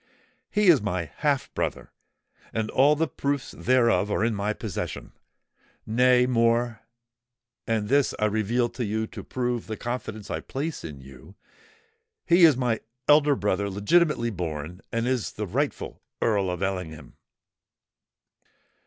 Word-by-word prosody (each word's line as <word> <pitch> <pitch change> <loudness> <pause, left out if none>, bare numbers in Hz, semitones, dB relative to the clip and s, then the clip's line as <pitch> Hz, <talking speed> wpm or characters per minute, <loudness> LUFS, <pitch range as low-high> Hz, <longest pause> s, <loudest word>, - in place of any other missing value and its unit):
He 210 0 +1
is 155 -9 +6
my 90 -7 -3
half 145 -3 0
brother—and 110 -1 -6
all 145 +3 +5
the 160 +2 0
proofs 140 -2 -2
thereof 115 -6 +2
are 105 - +1
in 115 - +1
my 100 +1 -1
possession. 105 -3 -5 0.7
Nay, 125 +2 +4
more—and 120 -1 -2
this 140 +2 +2
I 105 - +1
reveal 110 +3 +1
to 120 +1 -5
you 110 +1 -1
to - - -9
prove 125 -2 -2
the 110 -1 -4
confidence 120 -4 -5
I - - -2
place 150 +4 -5
in 75 -4 -8
you—he 70 - -4
is 155 -6 +5
my 120 -4 0 0.3
elder 150 -1 +5
brother, 100 -3 0
legitimately 120 - +2
born, 85 -1 -5
and 115 0 -1
is 125 -3 -1
the 105 - -4
rightful 135 +10 -3 0.2
Earl 100 -4 +1
of 90 +1 -3
Ellingham!" 80 -7 -4
115 Hz, 130 wpm, -26 LUFS, 100-130 Hz, 0.7 s, is